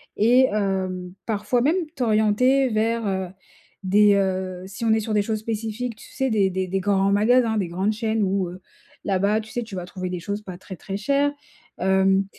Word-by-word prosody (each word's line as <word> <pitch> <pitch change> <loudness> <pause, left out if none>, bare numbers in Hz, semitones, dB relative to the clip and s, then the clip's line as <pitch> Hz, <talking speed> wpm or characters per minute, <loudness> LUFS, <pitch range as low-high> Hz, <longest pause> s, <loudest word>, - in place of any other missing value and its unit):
Et, 245 +5 +5
hem, 185 -3 -2
parfois 220 +3 0
même 300 +7 +3 0.2
t'orienter 250 +3 +3
vers, 225 +1 0
heu, 190 -1 -1 0.6
des, 205 +2 +5
heu, 185 -2 -1
si 215 +4 -6
on 220 - +4
est 220 - +3
sur 215 0 -3
des 210 - +3
choses 215 0 -2
spécifiques, 225 +2 -4
tu - - -14
sais? 265 0 0
Des 205 -4 +2
des 185 0 -2
des 195 +2 -1
grands 195 0 +2
magasins, 225 +2 +3
des 190 -4 0
grandes 190 +5 -1
chaînes, 220 -1 -1
où, 190 -1 0
heu, 180 +1 -10 0.4
là-bas 200 +2 +1
tu 220 - -13
sais 240 - -2
tu 220 -3 -9
vas 180 -1 -4
trouver 185 0 -5
des 180 -1 -4
choses 205 +3 -4
pas 185 -3 -8
très, 190 +1 -10
très 195 - -6
chères. 280 +7 +1 0.5
Hem, 190 +1 +3
205 Hz, 200 wpm, -23 LUFS, 190-225 Hz, 0.6 s, Et